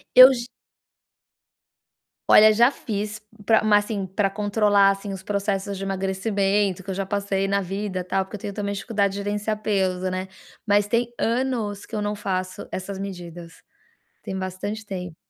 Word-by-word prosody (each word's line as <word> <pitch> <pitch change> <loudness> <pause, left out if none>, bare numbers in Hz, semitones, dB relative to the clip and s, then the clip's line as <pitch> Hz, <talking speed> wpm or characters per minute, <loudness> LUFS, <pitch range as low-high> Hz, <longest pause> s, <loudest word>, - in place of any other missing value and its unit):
Eu 255 +1 +11
j 240 -2 -3 1.8
Olha 215 0 +8
já 235 +4 +5
fiz, 215 -4 -4 0.3
pra 220 +1 +4
mas, 205 -1 +5
assim, 205 -3 -3
pra 195 +2 0
controlar, 205 -1 +3
assim, 195 +1 -5
os 190 -1 -6
processos 200 0 -2
de 195 - -5
emagrecimento 195 0 0
que 195 - -11
eu 190 - -1
já 195 +1 -2
passei 195 -1 -1
na 200 - +2
vida, 195 0 -3
tal, 190 +2 0
porque 210 +2 -8
eu - - -17
tenho 200 - -5
também 200 0 -3
dificuldade 200 0 0
de - - -5
gerenciar 210 +1 -2
peso, 185 -3 0
né. 185 +1 -4 0.4
Mas 205 -1 +3
tem 235 +2 0
anos, 230 -4 -1
que - - -23
eu 210 - -1
não 205 0 -2
faço 185 -2 -3
essas 190 +1 -5
medidas, 175 -3 -8 0.6
tem 190 - -5
bastante 190 +4 -4
tempo. 180 -4 -6
200 Hz, 170 wpm, -24 LUFS, 190-210 Hz, 1.8 s, Eu